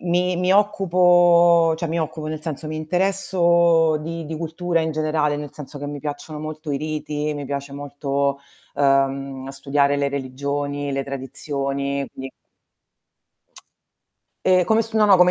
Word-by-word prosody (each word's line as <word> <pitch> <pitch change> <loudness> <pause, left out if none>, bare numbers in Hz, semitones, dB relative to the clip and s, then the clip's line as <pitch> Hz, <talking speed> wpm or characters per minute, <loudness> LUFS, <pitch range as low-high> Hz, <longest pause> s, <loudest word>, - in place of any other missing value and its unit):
Mi 180 +1 +1
mi 180 +1 +1
occupo 175 -4 +5
cioè 170 - -3
mi 165 +1 -1
occupo, 155 0 -4
nel 155 0 -5
senso 155 -1 -5
mi 155 - -4
interesso 170 -2 +2
di 165 +1 -5
di 160 0 -5
cultura 165 +1 -1
in 160 0 -1
generale, 155 -1 0
nel 145 -1 -7
senso 145 0 -9
che 145 - -5
mi 145 0 -6
piacciono 150 +1 -6
molto 155 -1 -5
i - - 0
riti, 150 0 -3
mi 145 -1 -5
piace 140 0 -5
molto, 140 -1 -2 0.3
ehm, 135 -1 +1
studiare 140 +1 +1
le 140 0 +1
religioni, 140 +1 -3
le 135 0 -2
tradizioni, 140 0 -3
quindi 135 0 -8 2.1
Ehm, 185 -1 +4
come 220 +4 +3
s 225 0 -5
no 215 -1 +4
no, 200 -2 +7
come 180 0 +6
155 Hz, 155 wpm, -22 LUFS, 140-170 Hz, 2.1 s, no